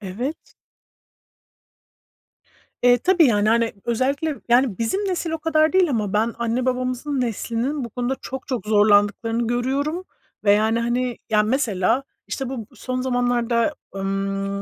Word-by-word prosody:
evet. 225 Hz, -, -6 dB, 2.3 s
Eee, 245 Hz, 0 st, +5 dB
tabii 360 Hz, +5 st, +4 dB
yani, 210 Hz, -3 st, +2 dB
hani, 230 Hz, 0 st, +2 dB
özellikle 275 Hz, +6 st, -1 dB
yani 240 Hz, -4 st, +3 dB
bizim 230 Hz, -, 0 dB
nesil 350 Hz, -3 st, -2 dB
o 325 Hz, -, -2 dB
kadar 310 Hz, 0 st, +2 dB
değil 370 Hz, -3 st, +4 dB
ama 210 Hz, -6 st, -1 dB
ben 220 Hz, +2 st, +1 dB
anne 235 Hz, +2 st, -1 dB
babamızın 255 Hz, +2 st, -1 dB
neslinin 245 Hz, +4 st, -2 dB
bu 235 Hz, -, -7 dB
konuda 245 Hz, +3 st, -2 dB
çok 265 Hz, 0 st, -7 dB
çok 250 Hz, -5 st, -3 dB
zorlandıklarını 210 Hz, +2 st, +3 dB
görüyorum 275 Hz, +8 st, -1 dB, 0.4 s
ve 205 Hz, -, +6 dB
yani, 220 Hz, +2 st, +2 dB
hani, 245 Hz, +1 st, -1 dB
ya 210 Hz, -1 st, +4 dB
mesela, 225 Hz, -1 st, +1 dB, 0.2 s
işte, 270 Hz, -2 st, -4 dB
bu 265 Hz, 0 st, -4 dB
b -, -, -12 dB
son 255 Hz, -1 st, -4 dB
zamanlarda, 245 Hz, +1 st, +1 dB, 0.2 s
ımm, 195 Hz, 0 st, -2 dB
240 Hz, 140 wpm, -22 LUFS, 220-265 Hz, 2.3 s, ve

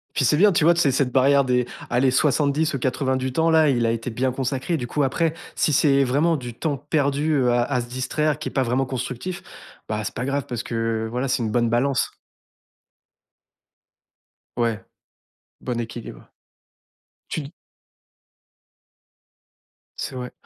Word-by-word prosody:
Puis, 135 Hz, -, +2 dB
c'est 150 Hz, +5 st, +3 dB
bien, 205 Hz, +3 st, +6 dB
tu 165 Hz, -, +2 dB
vois, 170 Hz, +2 st, +6 dB
tu 170 Hz, -, +1 dB
sais, 140 Hz, -, +3 dB
cette 130 Hz, -1 st, +1 dB
barrière 140 Hz, +2 st, +4 dB
des, 125 Hz, -1 st, +2 dB, 0.2 s
allez, 125 Hz, +2 st, +3 dB
70 150 Hz, +3 st, +2 dB
ou 140 Hz, -, -2 dB
80 130 Hz, +1 st, 0 dB
du 130 Hz, 0 st, -2 dB
temps-là, 160 Hz, +1 st, +3 dB
il 120 Hz, -4 st, +2 dB
a 115 Hz, -, +2 dB
été 115 Hz, +2 st, -3 dB
bien 130 Hz, +3 st, -1 dB
consacré. 135 Hz, +5 st, -2 dB
Du 120 Hz, -, -4 dB
coup, 145 Hz, +2 st, 0 dB
après, 160 Hz, +4 st, +1 dB, 0.2 s
si 155 Hz, -, +1 dB
c'est 140 Hz, -1 st, +4 dB
vraiment 150 Hz, +6 st, +2 dB
du 120 Hz, -4 st, -6 dB
temps 145 Hz, +2 st, -2 dB
perdu, 145 Hz, +1 st, 0 dB
heu, 125 Hz, -3 st, +3 dB
à 120 Hz, 0 st, +3 dB
à 125 Hz, -1 st, -1 dB
se 120 Hz, -, -7 dB
distraire, 145 Hz, +4 st, -1 dB
qui -, -, -4 dB
est -, -, -14 dB
pas 135 Hz, -, +1 dB
vraiment 130 Hz, +3 st, 0 dB
constructif, 130 Hz, +7 st, -5 dB, 0.4 s
bah, 105 Hz, 0 st, -2 dB
c'est -, -, -4 dB
pas 125 Hz, -, -3 dB
grave, 140 Hz, 0 st, -1 dB
parce 120 Hz, -1 st, -4 dB
que, 115 Hz, -1 st, -2 dB
voilà, 125 Hz, +3 st, -1 dB
c'est 125 Hz, -1 st, 0 dB
une 110 Hz, -, -2 dB
bonne 120 Hz, 0 st, +2 dB
balance. 125 Hz, +3 st, +1 dB, 2.5 s
Ouais, 115 Hz, -3 st, 0 dB, 0.8 s
bon 125 Hz, -2 st, -3 dB
équilibre. 115 Hz, -, -7 dB, 1.0 s
Tu 145 Hz, -3 st, -4 dB, 2.5 s
C'est 135 Hz, -, -5 dB
vrai. 125 Hz, -1 st, -5 dB
130 Hz, 165 wpm, -23 LUFS, 120-145 Hz, 2.5 s, bien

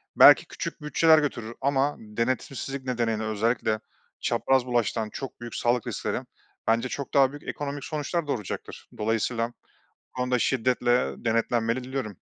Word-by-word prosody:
belki -, -, +9 dB
küçük -, -, -6 dB
bütçeler 155 Hz, +2 st, +5 dB
götürür 120 Hz, -6 st, -3 dB
ama 140 Hz, +1 st, +2 dB
denetimsizlik 130 Hz, +4 st, -3 dB
nedeniyle 115 Hz, -3 st, 0 dB
özellikle 110 Hz, +1 st, 0 dB, 0.4 s
çapraz 135 Hz, -2 st, +2 dB
bulaştıran 115 Hz, -3 st, 0 dB
çok 135 Hz, -, -6 dB
büyük 120 Hz, -1 st, -7 dB
sağlık 120 Hz, -1 st, +1 dB
riskleri -, -, -2 dB, 0.5 s
bence 115 Hz, +3 st, +2 dB
çok 140 Hz, 0 st, -5 dB
daha 135 Hz, -2 st, +5 dB
büyük 145 Hz, +1 st, -10 dB
ekonomik 145 Hz, -1 st, -4 dB
sonuçlar 155 Hz, +2 st, -2 dB
doğuracaktır. 110 Hz, -9 st, -5 dB
Dolayısıyla 115 Hz, +2 st, 0 dB
bu -, -, -28 dB, 0.4 s
konuda 125 Hz, 0 st, 0 dB
şiddetle 125 Hz, 0 st, +2 dB
denetlenmeli 115 Hz, +2 st, +1 dB
diliyorum. 130 Hz, -6 st, -4 dB
125 Hz, 130 wpm, -26 LUFS, 115-135 Hz, 0.5 s, belki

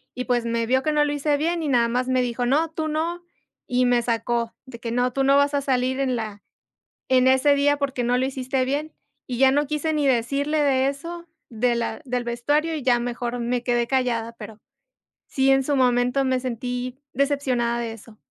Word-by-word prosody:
Y 250 Hz, -, -4 dB
pues 240 Hz, -1 st, 0 dB
me 230 Hz, 0 st, 0 dB
vio 260 Hz, +3 st, +2 dB
que 305 Hz, -, 0 dB
no 295 Hz, -1 st, +3 dB
lo 290 Hz, -, -1 dB
hice 290 Hz, 0 st, 0 dB
bien 335 Hz, +3 st, -1 dB
y 310 Hz, -, -2 dB
nada 240 Hz, -4 st, +3 dB
más 250 Hz, +2 st, -1 dB
me 255 Hz, -1 st, +2 dB
dijo: 245 Hz, 0 st, -2 dB
"No, 310 Hz, +5 st, +2 dB
tú 315 Hz, -1 st, -3 dB
no", 330 Hz, +3 st, -2 dB, 0.4 s
y 250 Hz, -1 st, +2 dB
me 245 Hz, -1 st, +3 dB
sacó 235 Hz, 0 st, -1 dB
de 245 Hz, -3 st, -11 dB
que: 230 Hz, -1 st, -5 dB
"No, 245 Hz, +1 st, 0 dB
tú 270 Hz, -, 0 dB
no 275 Hz, +1 st, +4 dB
vas 285 Hz, +1 st, +3 dB
a 285 Hz, -, +1 dB
salir 260 Hz, 0 st, 0 dB
en 260 Hz, -2 st, 0 dB
la 215 Hz, -3 st, -5 dB, 0.7 s
en 260 Hz, 0 st, +4 dB
ese 265 Hz, +2 st, +4 dB
día, 285 Hz, +1 st, +2 dB
porque 270 Hz, -3 st, -2 dB
no 245 Hz, +1 st, +2 dB
lo 260 Hz, -, +1 dB
hiciste 260 Hz, -1 st, -2 dB
bien". 295 Hz, +4 st, -2 dB, 0.3 s
Y 245 Hz, -2 st, -4 dB
ya 265 Hz, 0 st, +6 dB
no 290 Hz, +1 st, +1 dB
quise 305 Hz, +2 st, -1 dB
ni 295 Hz, -2 st, +1 dB
decirle 275 Hz, +5 st, +1 dB
de 265 Hz, -1 st, +2 dB
eso 335 Hz, +5 st, -6 dB, 0.2 s
de 240 Hz, +1 st, 0 dB
la 230 Hz, -1 st, -3 dB
del 245 Hz, -2 st, -2 dB
vestuario, 290 Hz, +7 st, 0 dB
y 295 Hz, -, -5 dB
ya 245 Hz, -2 st, +3 dB
mejor 240 Hz, 0 st, -3 dB
me 240 Hz, +1 st, -1 dB
quedé 240 Hz, -1 st, +1 dB
callada, 235 Hz, -3 st, 0 dB
pero 215 Hz, 0 st, -10 dB, 0.7 s
sí, 270 Hz, 0 st, +2 dB
en 270 Hz, 0 st, +4 dB
su 285 Hz, +2 st, 0 dB
momento 250 Hz, +1 st, +2 dB
me 260 Hz, -1 st, +1 dB
sentí 250 Hz, 0 st, -4 dB, 0.2 s
decepcionada 255 Hz, -4 st, 0 dB
de 235 Hz, -1 st, -3 dB
eso. 225 Hz, 0 st, -13 dB
255 Hz, 215 wpm, -23 LUFS, 240-280 Hz, 0.7 s, ya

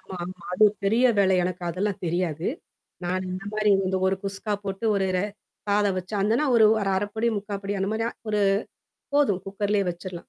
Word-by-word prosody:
ஆமா 190 Hz, -, -10 dB
ஆமா, 180 Hz, -1 st, -9 dB
அது 215 Hz, +4 st, +5 dB, 0.2 s
பெரிய 225 Hz, +6 st, +3 dB
வேலை 190 Hz, -1 st, +4 dB
எனக்கு 180 Hz, 0 st, -3 dB
அதெல்லாம் 190 Hz, +3 st, -2 dB
தெரியாது. 170 Hz, -1 st, -1 dB, 0.6 s
நானு 185 Hz, +1 st, -1 dB
இந்த 190 Hz, +1 st, -5 dB
மாதிரி 215 Hz, -1 st, +2 dB
வந்து 190 Hz, 0 st, 0 dB
1 190 Hz, 0 st, +2 dB
குஸ்கா 195 Hz, +2 st, -3 dB
போட்டு, 195 Hz, +3 st, -4 dB
1 195 Hz, -1 st, +1 dB, 0.6 s
சாதம் 200 Hz, -2 st, +2 dB
வச்சு, 185 Hz, +4 st, -6 dB
அதுன்னா 225 Hz, +9 st, +2 dB
1 225 Hz, -, +6 dB, 0.2 s
1 195 Hz, -1 st, 0 dB
அரை 205 Hz, +2 st, 0 dB
படி 225 Hz, +1 st, 0 dB
முக்கால் 200 Hz, 0 st, -4 dB
படி 200 Hz, 0 st, -2 dB
அந்த 195 Hz, +1 st, 0 dB
மாதிரி 225 Hz, +1 st, -1 dB, 0.2 s
1 210 Hz, -1 st, +1 dB, 0.8 s
போதும் 235 Hz, -11 st, +3 dB
குக்கர்லேயே 200 Hz, 0 st, 0 dB
வச்சிரலாம். 175 Hz, 0 st, -8 dB
195 Hz, 180 wpm, -25 LUFS, 185-210 Hz, 0.8 s, 1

